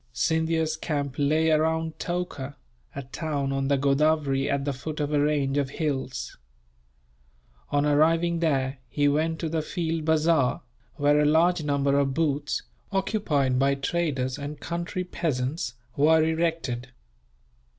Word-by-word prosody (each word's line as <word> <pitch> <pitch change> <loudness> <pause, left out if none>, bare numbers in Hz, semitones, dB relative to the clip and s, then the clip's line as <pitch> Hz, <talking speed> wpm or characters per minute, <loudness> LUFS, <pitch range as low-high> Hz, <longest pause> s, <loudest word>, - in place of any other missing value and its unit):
Scindia's 160 +2 +1
camp 145 -4 -2
lay 155 +3 +3
around 160 +1 +1
Toka, 175 -6 -4 0.4
a 140 - -4
town 140 +1 -3
on 135 0 -1
the 140 0 +2
Godavery 140 0 +2
at 140 0 0
the 140 - -1
foot 150 +4 -6
of 150 0 -1
a 145 - +3
range 145 -1 +1
of 140 -2 -1
hills. 135 - -3 1.3
On 145 0 +1
arriving 165 +3 +3
there 135 -5 0
he 145 -1 +1
went 160 +3 +1
to 165 - -3
the 160 0 -1
field 165 0 -2
bazaar, 160 -4 +2 0.3
where 145 0 +3
a 150 - +3
large 165 +3 +3
number 140 -1 +2
of 135 -1 0
booths, 145 -3 0 0.3
occupied 160 - +1
by 140 +1 +3
traders 140 -3 -1
and 145 +1 -6
country 170 +2 -3
peasants, 135 -6 -2 0.2
were 155 +2 +5
erected. 160 -6 -1
150 Hz, 140 wpm, -26 LUFS, 140-160 Hz, 1.3 s, were